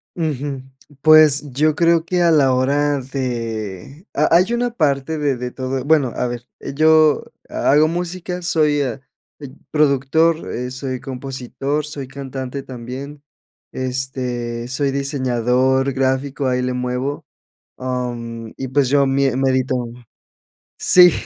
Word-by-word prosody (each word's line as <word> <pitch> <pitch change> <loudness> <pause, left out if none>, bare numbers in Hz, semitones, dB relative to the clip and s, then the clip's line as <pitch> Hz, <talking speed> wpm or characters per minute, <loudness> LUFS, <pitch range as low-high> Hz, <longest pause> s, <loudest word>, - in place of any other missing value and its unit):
Ujú. 145 -4 -3 0.4
Pues 155 -2 +7
yo 155 +3 +2
creo 170 -1 +3
que 180 0 0
a 170 - +4
la 140 -5 +4
hora 145 +3 +1
de 120 - -5
ha - - +3
hay 185 +7 +4
una 245 +1 0
parte 155 - 0
de 145 -4 0
de 125 0 -4
todo 130 +1 -4
Bueno, 145 -4 +3
a - - -1
ver, 120 0 -6 0.3
yo 155 0 +5 0.3
ha - - +1
hago 150 +2 +5
música, 180 +1 -4
soy, 150 -4 +2
eh, 130 -1 -2 0.7
productor, 155 +3 +2
eh, 125 +1 -3
soy 130 0 -4
compositor, 135 +2 -4
soy 145 -3 -6
cantante 135 0 -6
también, 135 +3 -8 0.5
este, 125 -2 -3
soy 140 +1 -1
diseñador 130 -1 +1
gráfico, 135 +1 0
ahí 125 0 +1
le 125 0 -1
muevo, 125 +3 -3 0.5
am, 120 -3 -4
y 135 - -4
pues 135 -1 +2
yo 140 0 +4
mie 135 -1 +1
medito. 130 -1 +1 1.0
Sí, 180 -2 +7
135 Hz, 130 wpm, -20 LUFS, 125-150 Hz, 1.0 s, Pues